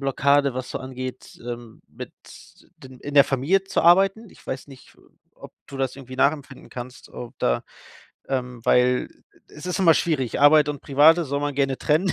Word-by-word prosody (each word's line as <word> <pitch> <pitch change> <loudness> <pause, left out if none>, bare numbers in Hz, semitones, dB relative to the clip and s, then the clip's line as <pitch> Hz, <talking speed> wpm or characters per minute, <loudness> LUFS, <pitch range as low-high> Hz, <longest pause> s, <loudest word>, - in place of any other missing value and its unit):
Blockade, 140 0 +2
was 130 0 -5
so - - -4
angeht, 130 -1 -8
ähm, 120 -2 -8
mit - - -10 0.6
den 130 -1 -14
in 145 - -7
der 140 -1 +8
Familie 145 +10 0
zu - - -1
arbeiten. 195 +5 +4
Ich - - -20
weiß 130 +2 -6
nicht, 135 -2 -16 0.4
ob - - -13
du 140 - -10
das 135 -1 -2
irgendwie 130 -1 -10
nachempfinden 140 -1 -1
kannst, 125 +1 -9
ob 120 +2 -9
da - - 0 0.7
ähm, 125 -2 -3
weil 125 0 +2 0.4
es 150 +4 -11
ist 180 +1 -2
immer 165 -4 +6
schwierig. 145 -9 -1
Arbeit 150 0 +6
und 145 -2 -7
Private 155 +5 +4
soll 140 0 -3
man 145 -1 -2
gerne 135 -1 0
trennen. 165 +5 +1
140 Hz, 180 wpm, -23 LUFS, 130-150 Hz, 0.7 s, der